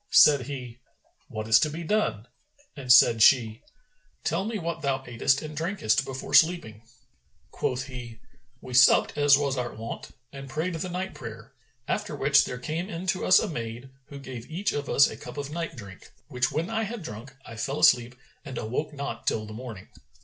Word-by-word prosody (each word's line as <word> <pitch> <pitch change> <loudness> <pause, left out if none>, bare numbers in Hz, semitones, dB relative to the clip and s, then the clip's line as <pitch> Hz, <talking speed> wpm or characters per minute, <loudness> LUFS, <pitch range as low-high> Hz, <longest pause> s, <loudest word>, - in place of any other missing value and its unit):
Said 140 -4 +6
he, 125 -4 -7 0.5
"What 110 0 -6
is 110 +1 +6
to 155 - +1
be 165 +3 -6
done?"; 165 - 0 0.5
and 130 -3 -2
said 115 -2 +7
she, 115 -2 +4 0.6
"Tell 175 +5 -1
me 220 0 -3
what 170 -2 -4
thou 140 -3 0
atest 135 +3 0
and 155 0 -7
drankest 160 - 0
before 135 -1 -7
sleeping." 160 -11 +3 0.7
Quoth 125 0 -2
he, 120 -4 -9 0.4
"We 125 - -9
supped 130 +1 +5
as 145 -1 +5
was 140 -2 -1
our 120 -1 -3
wont 115 +1 -7 0.2
and 135 0 -9
prayed 160 +6 -2
the 165 +3 -4
night 185 +2 -4
prayer, 115 0 -10 0.3
after 210 -7 -2
which 140 0 +4
there 125 - -5
came 160 +9 -4
in 175 -2 -6
to 185 - -6
us 185 - +6
a - - +1
maid, 120 -2 -6 0.2
who 140 - -10
gave 130 -3 -9
each 190 +5 -1
of 145 -1 -4
us 140 - +5
a - - -7
cup - - -10
of 145 0 -5
night 165 +1 -4
drink, 100 -6 -12 0.2
which 125 -3 0
when 165 +4 -2
I 225 - 0
had 220 -2 -5
drunk, 125 +1 -9
I 115 - -10
fell 135 +6 -3
asleep 120 0 +4 0.3
and 135 -5 -7
awoke 130 +7 -3
not 140 -5 -6
till 110 -1 0
the 110 - -9
morning." 110 -5 -9
135 Hz, 195 wpm, -26 LUFS, 120-160 Hz, 0.7 s, said